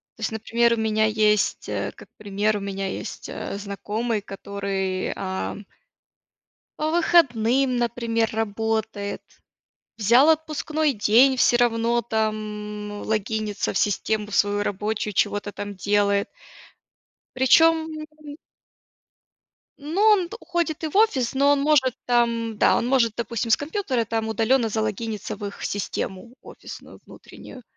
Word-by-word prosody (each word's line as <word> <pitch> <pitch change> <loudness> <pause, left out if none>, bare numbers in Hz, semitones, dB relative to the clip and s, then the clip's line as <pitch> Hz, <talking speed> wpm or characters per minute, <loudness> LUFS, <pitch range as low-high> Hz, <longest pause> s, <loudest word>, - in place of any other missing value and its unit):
То - - -16
есть, 220 - -1
например, 235 +2 +1
у - - -1
меня 220 -1 +1
есть, 215 -1 +1
э, - - -2
как - - -15
пример, 210 +1 -1
у - - -4
меня 195 -1 -4
есть, - - -6
э, - - -5
знакомый, 210 +2 -3
который, 195 -1 -3
ам 190 +2 -4 1.1
по 310 +1 0
выходным, 270 -7 +3
например, 230 -1 0
работает. 220 -1 -2 0.8
Взял 240 +8 +5
отпускной 310 -1 -1
день, 240 +5 +4
всё 245 0 +4
равно 235 0 +2
там, 215 -2 -3
м, 205 - -7
логинится 215 -1 -2
в - - 0
систему 210 +1 -1
свою 205 0 +1
рабочую, 210 +1 -2
чего-то 205 +2 0
там 205 0 -7
делает. 200 +1 +1 1.1
Причём 320 +5 +4 0.3
он 295 -1 -11 1.4
Ну, 305 +6 -4
он 415 -5 +4
т 440 - -8
уходит 340 -2 -2
и - - 0
в 305 - -5
офис, 280 - +2
но 280 +1 +3
он 285 - +2
может 275 -4 +3
там, 230 -2 +1
да, - - +4
он - - 0
может, 245 -4 +2
допустим, 235 0 -3
с - - +6
компьютера 285 - -2
там 225 0 -2
удаленно 225 +3 +2
залогиниться 215 0 -3
в 205 0 -6
их 200 - -9
систему 200 +2 -4
офисную - - -11
внутреннюю. 255 - -13
225 Hz, 135 wpm, -24 LUFS, 210-260 Hz, 1.4 s, с